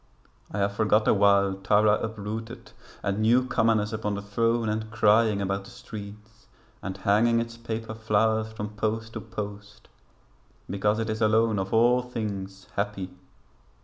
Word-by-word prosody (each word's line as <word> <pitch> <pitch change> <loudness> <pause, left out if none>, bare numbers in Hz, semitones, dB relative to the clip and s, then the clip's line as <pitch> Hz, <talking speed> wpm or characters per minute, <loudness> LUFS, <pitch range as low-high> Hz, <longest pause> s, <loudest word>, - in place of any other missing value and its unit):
I - - -4
have 100 0 +1
forgot 105 0 +2
awhile 100 -1 +4
Tara 105 +2 +3
uprooted, 110 +2 -6 0.3
and 100 0 -1
new 120 +4 +4
commonness 110 -3 +1
Upon 105 -2 -2
the 100 - -5
throne 115 +3 +1
and 110 0 -2
crying 110 -1 +3
about 100 +1 -2
the - - -12
streets 105 0 -11 0.3
And 95 0 -5
hanging 110 +4 +3
its 115 0 -4
paper 115 -1 -5
flowers 110 0 +1
from 105 -1 -5
post 110 +1 -3
to 110 - -5
post, 105 0 -8 0.8
Because 105 +2 0
it 115 -1 -1
is 110 +1 -4
alone 110 -1 +3
of 95 0 -3
all 120 +2 +4
things 100 -6 -5
happy. 100 -2 -2
110 Hz, 145 wpm, -26 LUFS, 100-115 Hz, 0.8 s, awhile